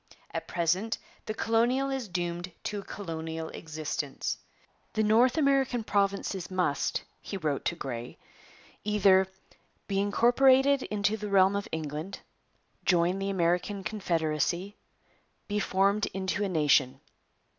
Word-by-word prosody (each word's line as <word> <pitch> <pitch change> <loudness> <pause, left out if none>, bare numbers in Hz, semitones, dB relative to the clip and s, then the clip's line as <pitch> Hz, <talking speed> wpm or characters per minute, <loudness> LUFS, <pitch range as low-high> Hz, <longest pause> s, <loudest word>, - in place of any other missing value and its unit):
At - - -4
present 180 +6 0 0.3
the 215 - -3
colonial 240 +5 +2
is 265 -4 -3
doomed 175 0 -3
to 210 - -3
a - - -8
colonial 160 -4 -5
existence. 155 -3 -4 0.5
'The 220 - +1
North 235 +6 +4
American 270 -5 +2
provinces 195 -3 0
must,' 180 -6 0 0.2
he 195 - -5
wrote 150 -6 -1
to 175 - 0
Grey, 125 -6 -6 0.7
'either: 195 -2 +4 0.6
Be 195 -1 0
incorporated 260 +6 +4
into 210 0 0
the 210 -1 -5
Realm 195 0 +5
of 200 +2 -2
England, 155 +4 -4 0.6
Join 180 +1 +2
the 195 0 -2
American 185 +2 0
Confederacy, 175 -1 -1 0.7
Be 210 0 -1
formed 200 +1 +2
into 190 +1 -1
a 200 - 0
nation. 140 -5 +3
195 Hz, 125 wpm, -29 LUFS, 170-215 Hz, 0.7 s, Realm